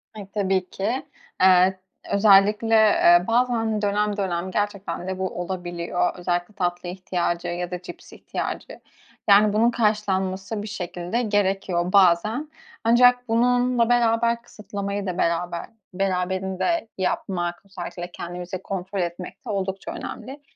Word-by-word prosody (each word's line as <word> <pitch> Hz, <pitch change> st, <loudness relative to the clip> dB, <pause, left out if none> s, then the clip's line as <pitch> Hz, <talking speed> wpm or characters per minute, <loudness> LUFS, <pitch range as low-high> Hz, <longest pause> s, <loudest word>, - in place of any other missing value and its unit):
Ay, 205 Hz, -3 st, -8 dB
tabii 190 Hz, -3 st, 0 dB
ki. 225 Hz, +7 st, -2 dB, 0.4 s
Iıı, 185 Hz, 0 st, +6 dB, 0.4 s
özellikle, 210 Hz, +2 st, +5 dB, 0.4 s
ııı, 175 Hz, -, -4 dB
bazen, 230 Hz, -2 st, +1 dB
dönem 205 Hz, 0 st, 0 dB
dönem 185 Hz, -1 st, -2 dB
gerçekten 200 Hz, -3 st, -3 dB
de 190 Hz, 0 st, -4 dB
bu 190 Hz, -, 0 dB
olabiliyor. 175 Hz, -1 st, -2 dB
Özellikle 175 Hz, +2 st, -2 dB
tatlı 175 Hz, -1 st, -2 dB
ihtiyacı 175 Hz, -1 st, -2 dB
ya 175 Hz, +1 st, -3 dB
da 180 Hz, 0 st, -4 dB
cips 175 Hz, -1 st, -11 dB
ihtiyacı, -, -, -5 dB, 0.5 s
yani, 205 Hz, +1 st, +6 dB
bunun 230 Hz, +3 st, +3 dB
karşılanması 205 Hz, -2 st, -1 dB
bir 210 Hz, -, -6 dB
şekilde 180 Hz, +2 st, -3 dB
gerekiyor 195 Hz, -4 st, 0 dB
bazen. 200 Hz, -, +3 dB, 0.3 s
Ancak 245 Hz, +2 st, +5 dB
bununla 245 Hz, +1 st, +2 dB
beraber 235 Hz, -1 st, +2 dB
kısıtlamayı 200 Hz, -3 st, -5 dB
da 185 Hz, -2 st, -3 dB
beraber 170 Hz, 0 st, -1 dB, 0.3 s
beraberinde 190 Hz, -, -1 dB
yapmak, 175 Hz, -2 st, -2 dB
özellikle 180 Hz, -2 st, -7 dB
kendimizi 175 Hz, +1 st, -6 dB
kontrol 190 Hz, +1 st, -4 dB
etmek 175 Hz, +8 st, -6 dB
de -, -, -7 dB
oldukça 195 Hz, -1 st, -3 dB
önemli. 265 Hz, +6 st, -7 dB
195 Hz, 125 wpm, -24 LUFS, 180-215 Hz, 0.5 s, Iıı